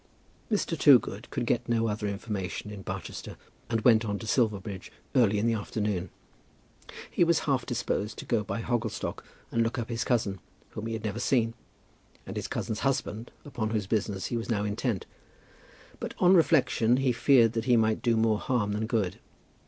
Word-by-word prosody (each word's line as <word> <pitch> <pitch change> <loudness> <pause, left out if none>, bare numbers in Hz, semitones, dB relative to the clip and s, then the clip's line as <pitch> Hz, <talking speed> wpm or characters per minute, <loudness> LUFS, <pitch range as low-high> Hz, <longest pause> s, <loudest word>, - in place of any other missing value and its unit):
Mr. 200 -5 0
Toogood 125 -7 +4
could 125 -4 -2
get 120 0 0
no 115 -1 +2
other 105 0 -2
information 100 -1 -4
in 100 -2 -7
Barchester, 95 -2 -6 0.3
and 115 -2 0
went 115 -1 +5
on 105 -2 -2
to 115 - -8
Silverbridge 105 -5 -1 0.2
early 115 -6 +4
in 105 - 0
the 115 - +3
afternoon. 105 -4 -2 1.0
He - - +3
was 170 -1 +3
half 135 -4 0
disposed 110 -4 -2
to - - -7
go 115 -3 +1
by 115 - -3
Hogglestock 120 -3 -2 0.3
and 115 - +1
look 115 0 0
up 115 -1 -3
his 115 0 -1
cousin, 110 -7 0 0.3
whom 110 +1 -5
he 115 - -3
had 110 0 -4
never 110 +1 -2
seen, 115 -3 +2 0.7
and - - -7
his - - -3
cousin's 110 -1 -3
husband, 120 -4 -1 0.2
upon 125 -7 -3
whose 110 -3 -1
business 100 -2 -1
he 120 - -2
was 115 - -5
now 105 -3 +1
intent; 105 0 -2 0.9
but - - -5
on 180 +1 +5
reflection 135 -8 +4
he 135 -1 +2
feared 120 -1 +4
that 115 -1 -2
he 125 -2 +4
might 110 -1 +2
do 115 -2 +2
more 110 -1 +2
harm 115 -5 0
than 105 +2 -1
good. 105 -7 -1
115 Hz, 185 wpm, -28 LUFS, 105-120 Hz, 1.0 s, went